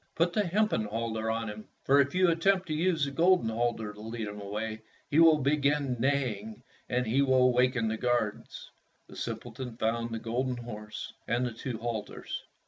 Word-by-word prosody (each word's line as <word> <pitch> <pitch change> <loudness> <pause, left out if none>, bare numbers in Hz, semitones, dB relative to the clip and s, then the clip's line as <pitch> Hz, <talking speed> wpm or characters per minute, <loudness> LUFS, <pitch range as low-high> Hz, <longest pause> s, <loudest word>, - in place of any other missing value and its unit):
Put 170 +1 +2
the 210 - +2
hempen 210 - +1
halter 110 +1 -2
on 115 0 -1
him, 105 0 -7 0.2
for 140 +1 +5
if 140 +4 -1
you 185 0 +5
attempt 185 +3 +2
to - - 0
use 165 -1 +1
the 140 - -4
golden 170 -4 +3
halter 115 -2 -1
to 105 - -12
lead 110 0 -4
him 105 0 -7
away 110 +2 -4 0.3
he 150 - +4
will 165 -2 +7
begin 140 -2 +1
neigh 130 -4 +1
ing 110 +3 -10 0.3
and 125 0 +1 0.2
will 130 -1 +5
waken 125 -2 +2
the 110 0 -1
guards." 120 -3 -2 0.4
The - - -13
simpleton 125 -3 -6
found 115 +1 0
the 115 - -3
golden 120 +3 -2
horse, 105 -3 -7
and 120 +2 +1
the 120 - -3
two 115 +1 -5
halters. 115 -2 -5
120 Hz, 185 wpm, -29 LUFS, 110-140 Hz, 0.4 s, will